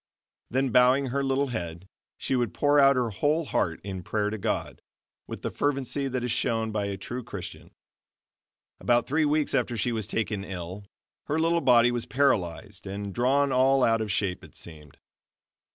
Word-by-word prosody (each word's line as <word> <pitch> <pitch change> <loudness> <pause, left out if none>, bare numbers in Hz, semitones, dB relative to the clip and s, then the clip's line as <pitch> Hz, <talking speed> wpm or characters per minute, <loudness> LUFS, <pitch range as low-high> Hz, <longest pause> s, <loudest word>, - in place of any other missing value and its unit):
Then 135 +2 0
bowing 130 +2 +4
her 140 +2 -1
little 135 +1 0
head, 85 -5 -5 0.3
she 135 - -1
would 120 -3 -1
pour 145 0 +3
out 140 0 +6
her 125 -3 0
whole 150 +9 0
heart 85 -8 -1
in 95 -2 -5
prayer 105 +3 -1
to 110 - -4
God, - - -3 0.5
with - - -8
the - - -2
fervency 140 -1 -1
that 130 -2 -3
is 125 - -1
shown 115 -2 0
by 105 -1 -1
a 100 -1 -3
true 120 +6 -6
Christian. - - -8 1.1
About 120 0 +2
three 155 +3 +1
weeks 150 0 +1
after 120 -3 0
she 120 +3 0
was 110 -3 -2
taken 105 -3 -2
ill 95 +1 -7 0.4
her 150 - -1
little 165 +1 +2
body 120 -3 +5
was 120 0 -3
paralyzed 105 -7 0
and 100 0 -5
drawn 135 +4 +2
all 130 +1 +3
out 115 0 +3
of 105 -2 -2
shape 95 -3 -1
it - - -15
seemed. 75 -4 -12
120 Hz, 180 wpm, -27 LUFS, 100-135 Hz, 1.1 s, out